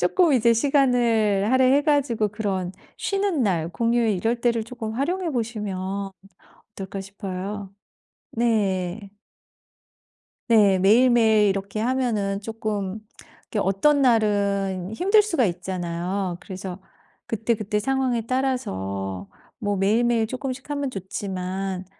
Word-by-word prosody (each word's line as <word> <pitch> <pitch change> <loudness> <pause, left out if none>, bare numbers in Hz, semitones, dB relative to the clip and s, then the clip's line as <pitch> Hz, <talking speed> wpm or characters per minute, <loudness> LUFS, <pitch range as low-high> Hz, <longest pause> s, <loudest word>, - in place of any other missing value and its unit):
쪼끔 350 -6 +3
이제 235 -2 +4
시간을 230 -6 +2
할애해 260 +2 +4
가지고 265 -8 +1
그런 195 -3 -3 0.2
쉬는 390 - 0
날, 170 -5 0
공휴일 230 +4 +1
이럴 230 +5 -1
때를 235 -2 +1
쪼끔 230 -2 -6
활용해 335 +8 -1
보시면 200 -5 -3 0.7
어떨까 195 0 -6
싶어요. 195 0 -6 0.6
네. 200 -4 0 1.4
네. 205 -4 +5
매일매일 220 0 +5
이렇게 195 +2 -2
하면은 225 -5 0
쪼끔 215 -2 -3 0.5
이렇게 215 - -2
어떤 275 +11 +3
날은 200 -5 +1
힘들 400 - +4
수가 330 - +1
있잖아요. 180 +1 -3
그래서 190 -1 -7 0.5
그때그때 220 -1 -1
상황에 255 -2 0
따라서 95 - -2 0.3
뭐 205 -3 -1
매일매일 225 +3 +2
쪼끔씩 260 +3 -5
하면 285 -2 -2
좋지만 190 -2 -4
215 Hz, 255 characters per minute, -24 LUFS, 195-245 Hz, 1.4 s, 네